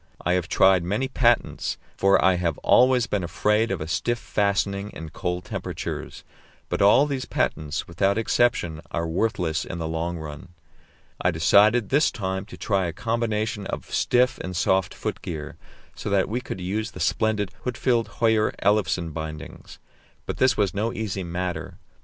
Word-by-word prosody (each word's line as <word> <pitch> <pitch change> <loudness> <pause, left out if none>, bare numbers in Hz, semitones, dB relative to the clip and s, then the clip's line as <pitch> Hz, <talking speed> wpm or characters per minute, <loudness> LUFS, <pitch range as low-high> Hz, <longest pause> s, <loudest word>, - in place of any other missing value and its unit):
I 90 - +3
have 90 -2 0
tried 95 -1 +4
many 105 +9 -1
patents, 120 -3 +1 0.2
for 95 0 +4
I 95 - +6
have 85 -3 -1
always 125 -1 +5
been 100 -5 -1
afraid 105 +6 +1
of 95 -5 -2
a 75 - -4
stiff 120 +8 0
fastening 100 -2 0
in 80 -1 -7
cold 90 +2 -3
temperatures; - - -5 0.5
but - - -1
all 105 +8 +6
these 135 -4 -3
patents, 75 -7 -2
without 95 +4 +1
exception, 110 -8 +1
are 85 0 -2
worthless 85 -3 0
in 90 - -6
the 80 -1 -3
long 85 +2 -2
run. 80 +2 -9 0.7
I 90 - +3
decided 100 +7 +4
this 145 +3 +4
time 95 -4 -3
to - - -11
try 95 -4 0
a 85 - -4
combination 110 0 -2
of - - -6
stiff 125 0 +2
and 95 0 -5
soft 95 +1 +1
foot - - -4
gear, 75 -3 -6 0.4
so - - -5
that 100 -1 +2
we 120 +4 -2
could 95 - -6
use 105 +5 -2
the - - -11
splendid 105 -3 0
Huitfeldt 125 -2 0
Höyer 110 -2 +2
Ellefsen 95 -5 +1
bindings; 80 -2 -7 0.5
but - - -4
this 130 -2 +3
was 100 -2 +1
no 110 +3 -1
easy 100 -4 -3
matter. 90 +1 -4
100 Hz, 165 wpm, -24 LUFS, 85-110 Hz, 0.7 s, I